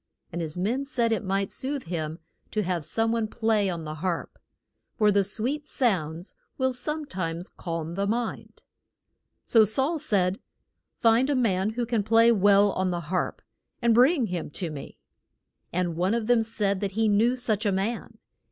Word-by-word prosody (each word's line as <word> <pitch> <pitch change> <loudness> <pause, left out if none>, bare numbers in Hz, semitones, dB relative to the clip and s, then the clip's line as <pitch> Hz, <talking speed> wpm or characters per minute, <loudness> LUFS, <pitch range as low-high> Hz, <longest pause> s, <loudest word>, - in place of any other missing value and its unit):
And 170 - -4
his 160 0 -3
men 230 +9 0
said 245 -5 0
it 225 - 0
might 195 0 -1
soothe 275 0 -2
him 160 -2 -4 0.3
to 215 - -1
have 180 -3 -2
some 225 +8 +1
one 230 -1 0
play 220 -3 +1
on 170 -3 -4
the 155 0 -5
harp. 170 +2 -4 0.6
For 210 -2 +4
sweet 245 +10 -1
sounds 175 - -1 0.2
will 260 -1 +1
some 300 +5 -2
times 175 -6 -4
calm 165 -2 -5
the 200 +2 -1
mind. 235 +2 -3 0.8
So 225 -2 +6
Saul 270 - +1
said, 195 -9 +2 0.6
Find 235 +4 +3
a 285 - +2
man 210 -4 +1
who 240 +1 -1
can 230 -2 0
play 230 +3 +5
well 205 -1 +5
on 185 0 -1
the 170 -2 -4
harp, 180 - -1 0.4
and 235 -2 +3
bring 255 +3 +4
him 180 -5 -4
to 165 +2 -3
me. 145 -2 -9 0.7
And 175 -1 -1
one 185 +6 +1
of 235 -2 -1
them 240 0 +4
said 210 -3 -1
that 200 -1 -3
he 220 +1 +1
knew 220 +4 +3
such 225 -4 -1
a - - +2
man. 200 +5 -3
210 Hz, 175 wpm, -26 LUFS, 180-235 Hz, 0.8 s, So